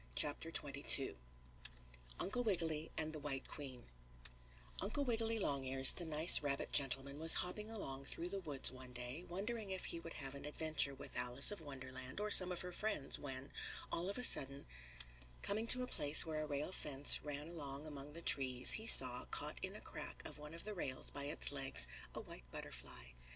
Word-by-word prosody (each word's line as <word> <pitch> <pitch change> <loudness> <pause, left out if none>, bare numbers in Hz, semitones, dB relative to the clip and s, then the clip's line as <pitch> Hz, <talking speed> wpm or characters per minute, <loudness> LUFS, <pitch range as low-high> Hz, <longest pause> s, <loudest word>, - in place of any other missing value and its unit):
CHAPTER - - -1
XXII - - +3 1.0
UNCLE 245 +5 -2
WIGGILY 165 -7 -2
AND 155 0 -3
THE 155 - -7
WHITE 140 -2 -5
QUEEN 130 -5 -9 1.0
Uncle 220 +9 -2
Wiggily 225 -2 -1
Longears, 135 -7 +4
the 175 - -5
nice 155 +2 +4
rabbit 140 -2 -4
gentleman, 140 0 0
was 160 +1 +4
hopping 210 +4 -3
along 135 -12 -7
through 170 +5 -5
the 195 +1 -5
woods 145 -9 +1
one 130 -1 -11
day, 125 +6 -6
wondering 210 +4 -5
if 190 -1 -4
he 170 - -3
would 165 0 -10
have 135 -1 -8
an 140 0 -9
adventure 150 -2 0
with 135 - -11
Alice 125 +5 +3
of 205 - -7
Wonderland 130 -1 -9
or 210 0 -3
some 185 -2 +7
of 180 - -3
her 180 - -7
friends, 210 -10 -4
when, 135 -1 -7 0.4
all 175 +3 -2
of 200 - -4
a 250 - -4
sudden, 140 - +3 0.8
coming 215 +3 -3
to 255 +2 +4
a - - -5
place 145 - +5
where 155 -1 -4
a 155 - -5
rail 145 +3 -3
fence 145 -5 +6
ran 150 +1 -6
along 145 -3 -7
among 145 -1 -8
the 170 +1 -10
trees 130 -2 +5
he 220 +1 +2
saw, 125 - +8
caught - - -2
in - - -6
a - - -10
crack - - -7
of - - -5
one 150 +2 -10
of 170 - -6
the 215 - -5
rails 135 -9 -4
by 140 0 -3
its 145 0 -1
legs, 135 - +1 0.3
a - - -5
white - - -13
butterfly. - - -10
150 Hz, 190 wpm, -37 LUFS, 135-180 Hz, 1.0 s, saw